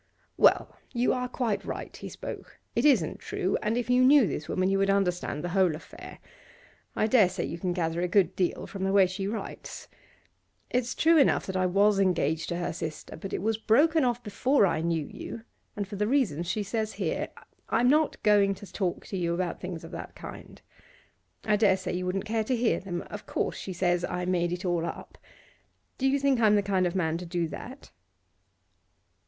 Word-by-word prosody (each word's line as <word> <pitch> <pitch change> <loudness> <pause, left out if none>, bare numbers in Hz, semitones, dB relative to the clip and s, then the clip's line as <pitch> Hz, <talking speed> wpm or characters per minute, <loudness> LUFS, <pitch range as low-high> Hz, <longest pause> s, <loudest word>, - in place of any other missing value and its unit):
'Well, - - +4 0.2
you 245 0 +2
are 250 -1 -2
quite 245 -4 -2
right,' - - -6
he - - -8
spoke. - - -8 0.2
'It - - +2
isn't 235 - +3
true, 185 - -2
and 220 +2 0
if 245 - -1
you 250 +1 +4
knew 275 -1 +7
this 155 - -4
woman 185 0 +1
you 195 0 +2
would 195 0 +2
understand 180 -6 0
the 175 - -2
whole 185 -3 +2
affair. 155 - -11 0.8
I - - +2
dare 215 -4 +5
say 185 -1 -3
you 170 - -5
can 180 0 -1
gather 170 -1 -1
a 180 - +1
good 190 +1 +2
deal 180 -2 -1
from 195 -1 -6
the 195 0 +1
way 195 -1 +6
she 190 +2 -3
writes. 220 +2 -6 0.8
It's 245 -1 0
true 325 0 +5
enough 275 - +3
that 190 - -5
I 185 0 +2
was 200 +2 +3
engaged 160 -4 +1
to 170 - -2
her 175 - -2
sister, 160 -2 -6
but 190 +4 -7
it - - -3
was 220 0 0
broken 305 +8 +4
off 245 -1 0
before 225 +4 +2
I 165 -4 0
knew 165 -2 0
you, 225 - -8 0.3
and 205 -2 -3
for 200 0 -7
the 210 +1 0
reasons 210 - +1
she 210 - -1
says 220 +1 -2
here. - - -2 0.4
I'm 245 - +3
not 305 +3 +2
going 200 -2 +4
to 195 -1 -13
talk 185 -4 -2
to 195 - -5
you 170 -1 0
about 180 -1 -3
things 180 -3 -6
of - - -10
that - - -8
kind; - - -10 0.8
I 210 -1 +3
dare 200 -3 +4
say 185 -1 -4
you 180 0 -2
wouldn't 190 +2 -2
care 220 0 0
to 255 - +1
hear 235 -1 +1
them. 175 -2 -5
Of 205 - -8
course - - -1
she 190 - -6
says 175 -1 +1
I 180 0 -2
made 175 -1 0
it 180 +1 -4
all 175 -2 0
up. - - -7 0.8
Do 270 - +2
you 275 +1 +3
think 275 -2 +2
I'm 215 -2 +5
the 205 - +2
kind 190 -2 +1
of 175 - -4
man 165 -3 0
to 180 - -7
do 170 -1 -1
that? 260 - -9
195 Hz, 210 wpm, -28 LUFS, 175-225 Hz, 0.8 s, knew